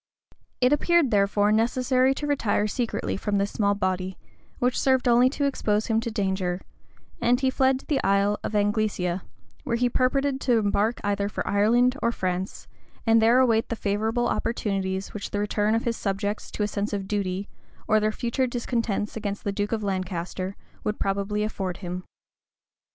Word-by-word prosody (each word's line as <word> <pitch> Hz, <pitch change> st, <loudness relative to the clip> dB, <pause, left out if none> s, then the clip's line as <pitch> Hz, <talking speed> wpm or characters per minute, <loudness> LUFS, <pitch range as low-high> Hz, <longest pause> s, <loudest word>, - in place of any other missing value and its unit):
It 250 Hz, +3 st, +5 dB
appeared, 335 Hz, -2 st, +3 dB
therefore, 205 Hz, 0 st, +3 dB
necessary 255 Hz, +4 st, +2 dB
to 295 Hz, -, -4 dB
retire 235 Hz, -8 st, +1 dB
secretly 230 Hz, +2 st, -2 dB
from 205 Hz, +1 st, -1 dB
this 200 Hz, +1 st, 0 dB
small 205 Hz, -1 st, +1 dB
body, 185 Hz, -1 st, -2 dB, 0.4 s
which 250 Hz, 0 st, +1 dB
served 260 Hz, -1 st, +2 dB
only 245 Hz, +1 st, +5 dB
to 285 Hz, +1 st, -1 dB
expose 215 Hz, -6 st, 0 dB
him 225 Hz, -1 st, +1 dB
to 230 Hz, -, -3 dB
danger; 190 Hz, -4 st, -1 dB, 0.6 s
and 245 Hz, +1 st, +3 dB
he 265 Hz, -1 st, +2 dB
fled 260 Hz, 0 st, +2 dB
to -, -, -22 dB
the 295 Hz, -4 st, 0 dB
Isle 200 Hz, +1 st, +2 dB
of 215 Hz, -, -3 dB
Anglesea, 205 Hz, -3 st, 0 dB, 0.4 s
where 235 Hz, -, -1 dB
he 245 Hz, +1 st, +2 dB
purposed 270 Hz, +2 st, +1 dB
to 245 Hz, -3 st, +2 dB
embark 210 Hz, +2 st, +1 dB
either 200 Hz, 0 st, 0 dB
for -, -, -4 dB
Ireland 240 Hz, +6 st, +3 dB
or 235 Hz, -, +2 dB
France, 185 Hz, -3 st, -3 dB, 0.4 s
and 225 Hz, -1 st, +5 dB
there 230 Hz, +3 st, +5 dB
await 230 Hz, -3 st, +2 dB
the 230 Hz, -, -1 dB
favorable 220 Hz, +3 st, 0 dB
opportunities 195 Hz, -5 st, -1 dB
which 210 Hz, -, -5 dB
the 205 Hz, -, -2 dB
return 210 Hz, +1 st, +1 dB
of 230 Hz, -, 0 dB
his 235 Hz, -1 st, -1 dB
subjects 205 Hz, +1 st, -2 dB
to 210 Hz, -, -1 dB
a -, -, +1 dB
sense 210 Hz, +1 st, -3 dB
of 195 Hz, -1 st, -3 dB
duty, 195 Hz, -1 st, -2 dB, 0.4 s
or 215 Hz, -, +4 dB
their 215 Hz, 0 st, +1 dB
future 240 Hz, +4 st, -1 dB
discontents 230 Hz, -4 st, -2 dB
against 205 Hz, -2 st, -4 dB
the 200 Hz, -, -1 dB
duke 205 Hz, +1 st, -2 dB
of 220 Hz, -2 st, -1 dB
Lancaster, 185 Hz, 0 st, -3 dB, 0.3 s
would 210 Hz, 0 st, -1 dB
probably 200 Hz, +2 st, -1 dB
afford 190 Hz, -4 st, -3 dB
him. 180 Hz, +1 st, -5 dB
210 Hz, 175 wpm, -25 LUFS, 200-240 Hz, 0.6 s, It